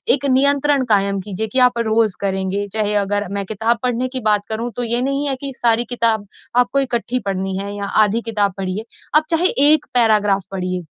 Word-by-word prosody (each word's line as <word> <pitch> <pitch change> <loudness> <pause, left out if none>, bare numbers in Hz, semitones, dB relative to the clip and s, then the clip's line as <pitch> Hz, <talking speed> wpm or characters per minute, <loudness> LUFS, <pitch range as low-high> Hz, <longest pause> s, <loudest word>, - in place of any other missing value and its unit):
एक 280 - -6
नियंत्रण 280 +1 +2
कायम 200 -1 +2
कीजिए 210 +2 -4
कि 260 - +4
आप 240 -1 -5
रोज 220 -3 +1
करेंगे। 195 +1 -2
चाहे 210 -1 +1
अगर 205 0 -1
मैं 200 -1 -3
किताब 225 +3 -1
पढ़ने 250 +1 -1
की 255 - 0
बात 210 -1 +2
करूँ 230 +2 -2
तो 245 - -3
ये 235 +1 +1
नहीं 275 +2 -1
है 270 - 0
कि 275 - -3
सारी 235 0 +2
किताब 230 -4 +1 0.3
आपको 245 +3 +2
इकट्ठी 250 -1 -2
पढ़नी 190 -1 -3
है 200 +1 -5
या 200 -1 -4 0.2
आधी 215 +3 0
किताब 210 -4 -1
पढिए, 195 +3 -4 0.3
आप 305 - +5
चाहे 340 +2 +2 0.2
1 310 - +3
पैराग्राफ 210 -5 +3
पढिए। 180 -2 -4
220 Hz, 195 wpm, -18 LUFS, 200-245 Hz, 0.3 s, आप